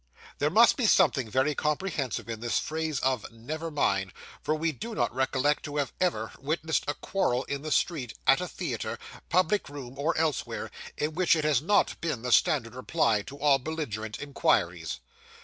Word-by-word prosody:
There 145 - +2
must 225 +8 +6
be 245 -5 +2
something 145 - +4
very 130 +6 +2
comprehensive 150 - -2
in 115 -2 -5
this 120 +1 0
phrase 155 -2 -2
of 130 -4 0
'Never 155 +9 -5
mind,' 95 - 0 0.3
for 155 - 0
we 160 +1 0
do 225 - -7
not - - 0
recollect 130 +3 +1
to 145 -1 -5
have 145 -2 -1
ever 115 -12 0
witnessed 160 +3 -1
a 145 - -1
quarrel 130 -10 0
in 140 0 -4
the 155 +1 -5
street, 140 - 0
at - - +5
a - - -3
theatre, - - -4 0.3
public 185 +1 +2
room, 135 -2 -9
or 160 +4 0
elsewhere, 155 -4 -1 0.3
in 150 +1 -1
which 175 0 +3
it 155 - -1
has 150 -4 +3
not 200 +7 +2
been 155 -9 -2
the 125 - -2
standard 120 -2 +3
reply 130 -4 +1
to 135 +7 -10
all 140 -1 +4
belligerent 125 -8 -4
inquiries. 145 -1 0
145 Hz, 180 wpm, -28 LUFS, 130-160 Hz, 0.3 s, must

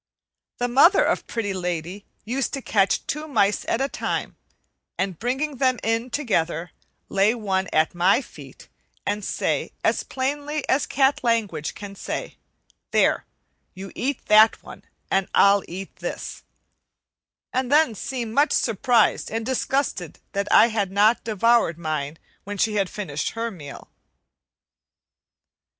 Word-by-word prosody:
The 245 - 0
mother 280 +11 +6
of - - 0
Pretty 220 -4 -2
Lady 180 +1 -4 0.2
used 250 +3 -2
to 275 - -3
catch 200 -2 +1
two 305 +1 -4
mice 210 -8 +2
at 230 - 0
a 270 - +2
time, - - -3 0.6
and 190 -3 -2
bringing 265 +5 -2
them 255 -1 +2
in 225 +2 0
together, 175 - -1 0.4
lay 200 +4 +2
one 195 -4 -1
at 155 0 +2
my 180 +6 +3
feet 275 - -12 0.4
and 205 0 -1
say - - -1
as - - +2
plainly 290 +3 -3
as 270 - +2
cat 270 0 +2
language 210 -11 0
can 205 -1 -8
say, 200 - -5 0.5
"There, - - +2 0.5
you 195 +1 -8
eat 275 +1 -3
that 215 +1 +5
one, - - -12 0.3
and 195 -1 +2
I'll 200 0 +6
eat 190 +3 -8
this," - - -6 1.1
and 255 0 -1
then 295 -5 +4
seem 235 +1 -4
much 290 +5 +3
surprised 230 +1 +2
and 225 0 -3
disgusted 260 - -1
that 200 0 -2
I 230 - +7
had 210 -4 -1
not 210 +4 +3
devoured 225 -4 +2
mine 155 -2 -3 0.3
when 205 +1 -6
she 215 +2 +1
had 200 -3 0
finished 155 -8 -4
her 230 0 -2
meal. 145 -8 -11
220 Hz, 140 wpm, -24 LUFS, 195-255 Hz, 1.1 s, I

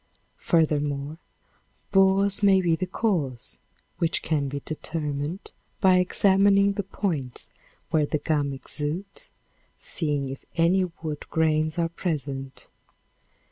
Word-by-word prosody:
Furthermore, 150 -2 +1 0.7
borers 195 +1 +4
may 195 -2 +6
be 170 -3 +2
the 185 +3 -3
cause, 170 - -2 0.4
which 165 - +1
can 150 -3 0
be 140 +1 -3
determined 155 +2 -4 0.3
by 185 -2 +5
examining 200 +2 +4
the 200 - -1
points 170 - -3 0.4
where 155 -2 +3
the 150 - 0
gum 145 -1 0
exudes, 150 +8 -4 0.5
seeing 145 -4 +1
if 135 - -7
any 175 +3 +3 0.2
wood 150 -2 -5
grains 155 0 +1
are 170 -1 +2
present. 140 -6 -4
160 Hz, 110 wpm, -26 LUFS, 145-190 Hz, 0.7 s, may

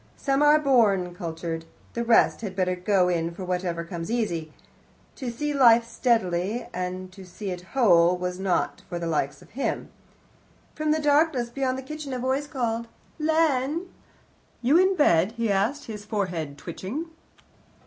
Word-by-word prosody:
Some 275 0 0
are 295 +1 +6
born 215 -11 +3
cultured; 165 -2 -5 0.3
the 235 - -2
rest 230 0 +4
had 195 -4 -5
better 185 -1 +1
go 180 0 +2
in 170 -2 0
for 185 - -6
whatever 180 -2 -2
comes 170 -1 -6
easy. 175 -10 -1 0.7
To 260 -4 -4
see 295 +5 -2
life 235 -4 +6
steadily 225 -3 0
and 185 +1 -4
to 190 +1 -12
see 190 +2 -6
it 180 -1 -5 0.2
whole 180 -7 +5
was 180 0 -4
not 190 -2 0
for 175 - -3
the 170 - -4
likes 150 -3 -1
of - - -21
him. 270 +5 -3 0.8
From 310 0 -2
the 310 - +3
darkness 290 -5 +2
beyond 260 0 -1
the 265 - -6
kitchen 305 -1 -6
a - - -2
voice 260 +3 -1
called, 235 -4 -2 0.3
"Len?" 315 +1 +1 0.7
"You 275 +7 +5
in 375 +1 +4
bed?" 195 - +3
he 230 -3 -1
asked, 215 +9 0
his 210 -2 -7
forehead 180 -9 -3
twitching. 195 - -5
215 Hz, 160 wpm, -26 LUFS, 180-270 Hz, 0.8 s, are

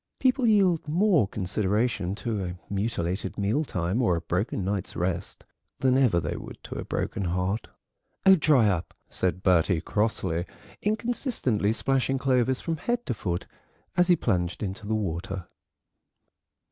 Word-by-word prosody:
People 255 -1 +2
yield 190 -8 +3
more 170 - +3
consideration 100 0 0
to 110 -2 -2
a 90 -1 -4 0.2
mutilated 100 -3 -2
mealtime 100 - 0
or 100 -8 +3
a 85 - -2
broken 95 +2 -1
night's 100 -1 -2
rest, 90 +1 -2 0.3
than 130 -1 +2
ever 125 -10 +4
they - - -3
would - - -8
to - - -7
a - - -4
broken 100 - -2
heart." 90 +5 -1 0.6
"Oh, 190 - +9
dry 150 - +4
up," 90 -4 -1
said 95 0 -1
Bertie 90 -1 +3
crossly, 95 -5 0 0.3
inconsistently 215 - 0
splashing 135 +3 +1
Clovis 130 -1 +2
from 165 -1 -2
head 240 +9 -2
to 125 - -1
foot 90 -5 -3 0.5
as 180 0 +4
he 180 - +6
plunged 90 - -1
into 100 +1 -5
the 110 - 0
water. 95 -2 -3
105 Hz, 145 wpm, -27 LUFS, 95-135 Hz, 0.6 s, Oh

